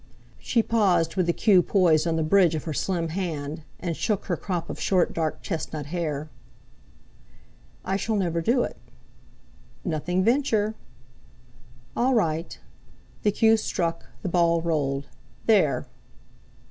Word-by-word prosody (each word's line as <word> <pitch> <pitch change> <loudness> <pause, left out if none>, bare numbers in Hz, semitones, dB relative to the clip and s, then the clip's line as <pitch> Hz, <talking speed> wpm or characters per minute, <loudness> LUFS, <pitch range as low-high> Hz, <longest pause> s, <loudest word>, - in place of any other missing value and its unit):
She 230 -2 +1
paused 190 -8 +2
with 185 -3 +1
the - - +4
cue 190 0 +4
poised 175 -5 +3
on 165 - +1
the 160 - +1
bridge 170 0 +4
of 155 - -3
her 160 - -4
slim 170 +1 -1
hand, 160 -4 -4 0.2
and 170 -2 -3
shook 210 +3 -1
her 180 - 0
crop 175 -2 -3
of - - -6
short 185 -3 +2
dark 160 -2 -2
chestnut 155 -2 -4
hair. 155 -2 -3 1.6
"I 190 +1 0
shall 215 +3 -1
never 170 -4 0
do 240 +8 +2
it." - - -5 1.1
"'Nothing 180 +2 0
venture.'" 225 -3 +2 1.2
"All 255 +2 +2
right." 165 -6 0 0.6
The 210 - +3
cue 225 +2 +4
struck, 170 -6 -2 0.2
the 185 - -1
ball 170 -1 +3
rolled. 140 -4 -1 0.4
"There!" 195 -10 +3
175 Hz, 135 wpm, -25 LUFS, 160-200 Hz, 1.6 s, the